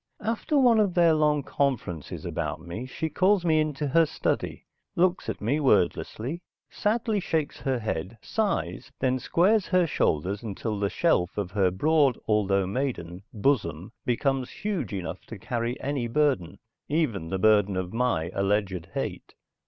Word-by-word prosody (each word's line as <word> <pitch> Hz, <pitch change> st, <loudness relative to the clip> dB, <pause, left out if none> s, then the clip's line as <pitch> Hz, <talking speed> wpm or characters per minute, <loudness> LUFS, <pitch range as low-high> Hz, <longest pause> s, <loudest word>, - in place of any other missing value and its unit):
After 230 Hz, +7 st, 0 dB
one 245 Hz, -5 st, +5 dB
of 200 Hz, -4 st, +2 dB
their 170 Hz, -2 st, +5 dB
long 150 Hz, -2 st, +2 dB
conferences 125 Hz, -, -2 dB
about -, -, -3 dB
me 90 Hz, +9 st, -6 dB
she 160 Hz, +5 st, -3 dB
calls 185 Hz, +4 st, +2 dB
me 160 Hz, -2 st, +4 dB
into 150 Hz, -1 st, -1 dB
her 165 Hz, +3 st, +4 dB
study, -, -, -2 dB, 0.3 s
looks 180 Hz, +1 st, +1 dB
at -, -, -3 dB
me 135 Hz, +8 st, +1 dB
wordlessly, 125 Hz, -, +1 dB, 0.3 s
sadly, 215 Hz, 0 st, 0 dB
shakes 160 Hz, -5 st, -2 dB
her 135 Hz, -2 st, 0 dB
head, 110 Hz, -2 st, -4 dB
sighs 130 Hz, -, -2 dB
then 130 Hz, -1 st, +1 dB
squares 190 Hz, -, +2 dB
her 185 Hz, -1 st, +3 dB
shoulders 95 Hz, -, 0 dB
until 105 Hz, -1 st, -4 dB
the 100 Hz, -1 st, +1 dB
shelf 95 Hz, -, +1 dB
of 100 Hz, -3 st, -2 dB
her 95 Hz, -2 st, +2 dB
broad, 140 Hz, -, +3 dB
although 100 Hz, -3 st, +2 dB
maiden, 95 Hz, -6 st, -3 dB
bosom 105 Hz, -, 0 dB
becomes 130 Hz, +1 st, 0 dB
huge 205 Hz, -, -3 dB
enough 90 Hz, -3 st, -5 dB
to 115 Hz, -, -8 dB
carry 120 Hz, +4 st, -3 dB
any 135 Hz, -3 st, -2 dB
burden, 115 Hz, -, +1 dB, 0.3 s
even 125 Hz, -, 0 dB
the 95 Hz, -, -1 dB
burden 105 Hz, -1 st, +3 dB
of 95 Hz, +1 st, -3 dB
my 115 Hz, -9 st, 0 dB
alleged 100 Hz, -3 st, 0 dB
hate. -, -, -4 dB
125 Hz, 150 wpm, -27 LUFS, 100-160 Hz, 0.3 s, one